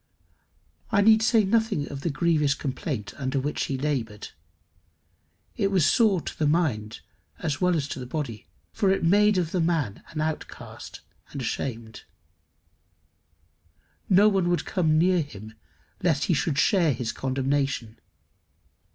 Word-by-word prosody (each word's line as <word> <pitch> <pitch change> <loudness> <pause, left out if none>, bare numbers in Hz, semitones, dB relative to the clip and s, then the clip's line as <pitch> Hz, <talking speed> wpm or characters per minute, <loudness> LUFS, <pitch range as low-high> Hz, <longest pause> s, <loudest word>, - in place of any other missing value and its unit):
I 205 -2 +4
need 220 +1 +6
say 220 0 +4
nothing 205 -6 +1
of 140 -1 -6
the 170 - -1
grievous 150 -2 +1
complaint 130 -5 -4
under 135 -1 -1
which 145 +3 -2
he 135 - -3
laboured. 130 -7 -3 1.3
It 195 - +1
was 185 -6 +3
sore 205 -5 +3
to - - -8
the 155 - +2
mind 130 -10 0 0.4
as 145 -3 -3
well 180 -1 +3
as 145 -3 -1
the 130 -2 -6
body, 125 -6 -5 0.3
for 195 - +1
it 190 -1 +1
made 205 +4 +4
of 170 -3 -1
the 180 - 0
man 160 - -1
an 155 - -6
outcast 155 0 -6 0.3
and 140 - -7
ashamed. 115 -2 -5 2.0
No 200 +2 +6
one 190 -4 +2
would 175 - 0
come 160 -4 +1
near 180 +1 +3
him 110 -6 -9 0.5
lest 160 -6 +1
he 180 - +1
should 150 -1 0
share 170 -2 +3
his 115 -1 -3
condemnation. 135 -3 -2
155 Hz, 145 wpm, -26 LUFS, 135-180 Hz, 2.0 s, need